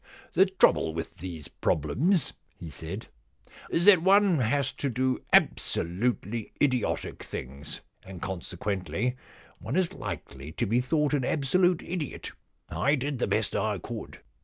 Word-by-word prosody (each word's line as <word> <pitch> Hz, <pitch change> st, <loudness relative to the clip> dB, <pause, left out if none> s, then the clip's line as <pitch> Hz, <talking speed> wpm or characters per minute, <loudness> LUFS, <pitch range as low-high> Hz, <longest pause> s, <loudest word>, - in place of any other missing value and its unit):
* -, -, -26 dB
The 190 Hz, +4 st, +5 dB
trouble 135 Hz, -, +3 dB
with 80 Hz, +1 st, -5 dB
these 85 Hz, -5 st, -7 dB
problems,' 135 Hz, -, +1 dB, 0.3 s
he 85 Hz, -3 st, -7 dB
said, 85 Hz, +8 st, -6 dB, 0.3 s
* -, -, -20 dB
is 170 Hz, -, +1 dB
that 195 Hz, -5 st, +8 dB
one 195 Hz, -2 st, +5 dB
has 130 Hz, +3 st, +1 dB
to 140 Hz, -, -2 dB
do 130 Hz, +1 st, 0 dB
absolutely 110 Hz, +4 st, +1 dB
idiotic 130 Hz, -5 st, 0 dB
things, 70 Hz, +3 st, -7 dB, 0.2 s
and 95 Hz, -2 st, -10 dB
consequently 95 Hz, +6 st, -2 dB, 0.4 s
one 115 Hz, +7 st, -4 dB
is 185 Hz, 0 st, +1 dB
likely 80 Hz, -, -7 dB
to 120 Hz, -, -1 dB
be 115 Hz, +4 st, +2 dB
thought 150 Hz, +3 st, +1 dB
an 140 Hz, -3 st, +2 dB
absolute 170 Hz, +7 st, +2 dB
idiot. 170 Hz, -6 st, -4 dB, 0.4 s
I 140 Hz, +2 st, +2 dB
did 140 Hz, -1 st, -3 dB
the -, -, +1 dB
best -, -, 0 dB
I -, -, 0 dB
could. -, -, -8 dB
125 Hz, 145 wpm, -28 LUFS, -, 0.4 s, that